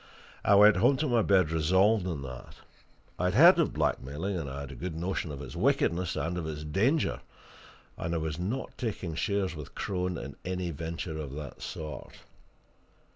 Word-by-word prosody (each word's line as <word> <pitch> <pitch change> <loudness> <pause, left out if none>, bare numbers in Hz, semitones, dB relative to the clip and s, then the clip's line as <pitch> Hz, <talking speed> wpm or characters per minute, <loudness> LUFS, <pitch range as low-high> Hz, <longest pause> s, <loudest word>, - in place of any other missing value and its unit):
I 100 - +5
went 105 0 +7
home 130 +9 +4
to 155 - 0
my 120 -3 +3
bed 95 -6 +3
resolved 95 +5 +3
on 80 -6 -3
that. 65 -2 -9 0.6
I 90 - +1
had 90 +2 +1
heard 170 - +8
of 165 - +2
blackmailing, 75 +5 -1
and 80 -6 -3
had 70 0 -6
a - - -9
good 90 -2 -5
notion 85 -1 -2
of 70 0 -7
its 65 - -9
wickedness 90 +1 +1
and 90 +2 -2
of 80 - -4
its 75 -1 -5
danger 115 - +1 0.8
and 85 +1 -2
I - - +1
was 80 0 -3
not 110 +9 -3
taking 100 -8 -3
shares 95 +1 -1
with 75 -2 -9
Crone 90 -2 -2
in - - -7
any 90 -1 -2
venture 80 +1 -5
of 70 -3 -6
that 75 -2 -8
sort. 75 -3 -7
85 Hz, 180 wpm, -29 LUFS, 75-100 Hz, 0.8 s, heard